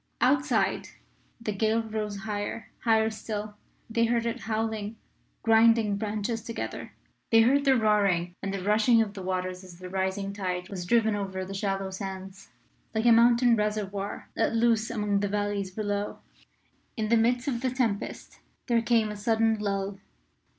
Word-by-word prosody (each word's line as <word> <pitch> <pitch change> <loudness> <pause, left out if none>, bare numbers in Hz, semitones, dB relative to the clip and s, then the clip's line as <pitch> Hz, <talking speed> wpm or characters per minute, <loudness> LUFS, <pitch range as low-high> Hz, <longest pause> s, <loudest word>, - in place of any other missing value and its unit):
Outside, 265 -1 +2 0.5
the 225 -2 -3
gale 220 +2 +1
rose 215 -2 -4
higher 210 +2 -4
higher 220 -1 +3
still. 215 -1 -5 0.3
They 230 0 +1
heard 235 0 +1
it 230 - -2
howling, 220 -1 -2 0.5
grinding 225 -2 +4
branches 215 +2 -2
together; 230 - -6 0.4
they 225 0 +6
heard 275 +5 +3
the 270 -1 +5
roaring 200 -6 +2
and 195 - -3
the 195 -2 -4
rushing 220 +3 +4
of 205 -2 -7
the 200 - -7
waters 185 0 -3
as 180 -2 -12
the 185 +1 -9
rising 190 +1 -2
tide 180 -2 -3
was 180 -3 -5
driven 220 0 +3
over 190 -2 -3
the 195 - -7
shallow 195 -1 -2
sands, 190 0 -7 0.5
like 220 +1 0
a 240 - +7
mountain 235 +1 +5
reservoir 210 -2 -2
at - - +1
loose 230 -1 +2
among 210 -3 0
the 205 - 0
valleys 205 -1 -1
below. 205 +1 -3 0.8
In 215 -1 -1
the 235 - +5
midst 245 +3 +2
of 240 -4 -1
the 260 - +1
tempest 240 -6 -3 0.3
there 235 -1 +2
came 230 -2 +2
a - - -5
sudden 220 +1 +1
lull. 195 -1 -2
215 Hz, 160 wpm, -28 LUFS, 195-230 Hz, 0.8 s, a